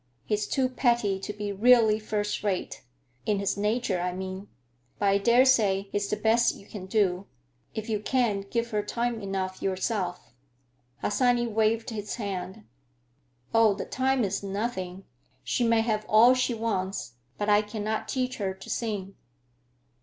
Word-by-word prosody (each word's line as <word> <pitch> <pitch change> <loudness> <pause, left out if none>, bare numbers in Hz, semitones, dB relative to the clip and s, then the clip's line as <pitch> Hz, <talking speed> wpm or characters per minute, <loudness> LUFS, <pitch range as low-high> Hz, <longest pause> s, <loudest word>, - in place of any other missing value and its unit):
He's 210 -1 -1
too 265 -1 +1
petty 235 -6 +1
to 195 - -5
be 210 0 -4
really 220 +1 +5
first 210 -1 -2
rate; 195 -3 -2 0.5
in 210 - +2
his 200 0 0
nature, 210 -1 0
I 180 0 -1
mean. 190 +2 -6 0.5
But 200 - +2
I 195 - +4
dare 240 +5 +5
say 200 -6 +3
he's 205 0 -1
the - - +1
best 225 +2 +3
you 200 - -14
can 190 -3 -8
do, 190 -2 +1 0.5
if 220 0 -4
you 215 -2 0
can't 210 -4 0
give 235 0 -1
her 210 -1 +1
time 235 +2 -2
enough 190 -1 -3
yourself." 190 - -2 0.7
Harsanyi 245 +1 +2
waved 225 +1 +1
his 210 -2 -4
hand. 200 -1 -5 0.9
"Oh, 225 -3 +5
the - - -5
time 260 -1 +1
is 200 -1 -1
nothing—she 190 - -4
may 230 -1 +4
have 215 -2 0
all 230 +4 +7
she 255 -1 0
wants. 195 - -2 0.2
But 205 - -2
I 205 0 +6
cannot 215 +1 -3
teach 255 -1 -2
her 190 -3 -2
to 190 - -12
sing." 205 -4 -3
210 Hz, 155 wpm, -27 LUFS, 195-230 Hz, 0.9 s, all